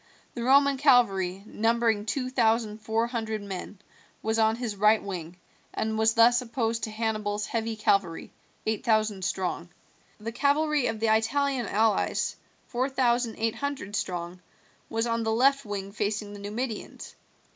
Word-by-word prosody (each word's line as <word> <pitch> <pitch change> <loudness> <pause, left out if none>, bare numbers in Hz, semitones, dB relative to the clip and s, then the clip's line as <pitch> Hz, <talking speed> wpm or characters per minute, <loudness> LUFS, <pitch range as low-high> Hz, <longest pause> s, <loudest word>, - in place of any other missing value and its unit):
The 240 - -5
Roman 275 +2 +4
cavalry, 195 -9 +3
numbering 225 -1 +1
two 255 +2 -2
thousand 225 -3 +1
four 220 +1 0
hundred 220 -3 -3
men, 195 +1 -7 0.5
was 220 +1 0
on 220 0 +3
his 235 -3 -4
right 210 +2 +4
wing, 175 -3 -6 0.4
and 220 0 -1
was 220 +1 +2
thus 240 +2 +6
opposed 230 -2 -2
to - - -7
Hannibal's 215 -1 -2
heavy 225 0 -2
cavalry, 200 -5 0 0.3
eight 220 -1 -1
thousand 215 -3 +1
strong. 180 -2 -2 0.5
The 225 +2 -5
cavalry 290 +2 +2
of 225 - -3
the 220 0 +3
Italian 260 +2 0
allies, 220 +2 +1 0.3
four 255 +2 -1
thousand 245 -3 +1
eight 225 0 0
hundred 280 -7 -4
strong, 175 -1 -3 0.5
was 225 +1 -1
on 230 -1 0
the 225 -1 0
left 275 +4 +3
wing 200 -1 -5
facing 205 0 -2
the 205 - -9
Numidians. 215 +3 -5
220 Hz, 150 wpm, -27 LUFS, 210-240 Hz, 0.5 s, thus